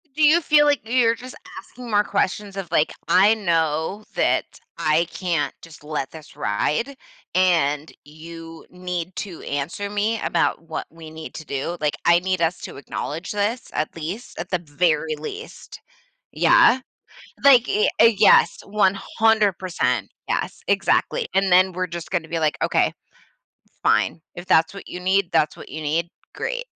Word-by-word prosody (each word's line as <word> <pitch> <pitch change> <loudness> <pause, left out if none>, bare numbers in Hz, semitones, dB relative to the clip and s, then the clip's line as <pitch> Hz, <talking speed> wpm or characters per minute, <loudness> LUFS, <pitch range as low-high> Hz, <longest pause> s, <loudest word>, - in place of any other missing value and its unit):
Do 310 - +1
you 310 +3 +6
feel 300 -2 +4
like 290 -1 +3
y 225 - -10
you're 230 -3 +4
just 255 +2 -10 0.2
asking 245 -1 -11
more 205 0 +4
questions 200 +1 -1
of, 190 -4 -6
like, 155 -2 +2 0.2
"I 200 +4 +6
know 170 0 -1
that - - +2 0.3
I 155 +2 +2
can't 175 -5 -1
just 165 -3 -14
let 150 -3 -4
this 155 -1 -13
ride, 150 - -1 0.4
and 160 -5 +2
you 165 +2 -11
need 180 -1 -5
to 185 -5 -6
answer 150 +8 -4
me 210 +2 -1
about 165 -1 0
what 160 - -4
we 165 -1 -12
need 160 0 -9
to 155 - -8
do, 140 +5 -3
like, 150 -1 0
I 170 0 +6
need 185 0 -1
us 165 +1 +1
to - - -8
acknowledge 155 +4 -5
this 210 +4 -1
at 155 - -2
least 170 +9 -7
at - - -5
the 180 - +1
very 155 0 0
least." 150 - -9 0.5
Yeah. 260 - +5 0.7
Like, 250 -4 +7
eh, 210 - +2
a 230 - +8
yes, 210 -2 +5
100%. 195 - +1 0.2
Yes, - - -2
exactly, - - +1
and 195 0 +2
then 185 +1 +5
we're 185 0 -3
just 170 0 -7
gonna 170 -3 -1
be 165 0 -2
like, 155 -1 0
"Okay. - - +2 0.9
Fine. - - +2
If 175 0 -8
that's 165 -1 +3
what 200 - -10
you 180 - -7
need, 190 0 +1
that's 155 - +2
what - - -11
you 155 +3 -6
need. 160 +3 -1 0.3
Great, - - -3
180 Hz, 165 wpm, -22 LUFS, 160-205 Hz, 0.9 s, a